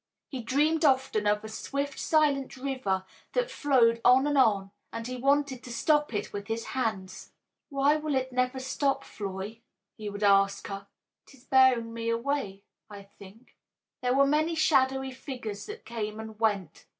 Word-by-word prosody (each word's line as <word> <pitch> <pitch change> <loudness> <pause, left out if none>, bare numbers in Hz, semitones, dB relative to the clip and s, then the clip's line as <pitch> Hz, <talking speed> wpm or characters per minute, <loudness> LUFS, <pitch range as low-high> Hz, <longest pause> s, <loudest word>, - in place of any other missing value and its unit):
He 265 -3 -5
dreamed 300 +7 +1
often 260 -7 +2
of 210 +1 +2
a - - -6
swift, 280 +5 -4
silent 290 -4 +1
river 255 -9 -2 0.3
that - - 0
flowed 235 - +3
on 255 +3 +6
and 290 0 +1
on, 200 -7 +3 0.2
and 230 0 -5
he 255 +1 -4
wanted 275 0 +1
to 245 - -9
stop 295 +4 +2
it 205 - -4
with 200 0 -5
his 225 +1 -3
hands. 215 -7 -3 0.4
"Why 280 +1 +3
will 305 -2 -2
it 260 -1 -1
never 255 +1 0
stop, 275 +1 -1
Floy?" 200 +2 -6 0.4
he 215 -2 -5
would 205 +1 -6
ask 195 -1 +3
her. 195 0 -6 0.4
"It - - -16
is 250 - -21
bearing 260 -4 +4
me 230 0 -3
away, 230 -5 -2 0.3
I 200 -1 -10 0.2
think." 205 +6 -15 0.5
There 250 0 +1
were 275 0 +5
many 310 +4 +1
shadowy 265 -4 +2
figures 250 -6 -7
that 430 +2 -9
came 215 -2 -4
and 220 -1 -9
went. 205 -7 -1
250 Hz, 170 wpm, -28 LUFS, 215-275 Hz, 0.5 s, on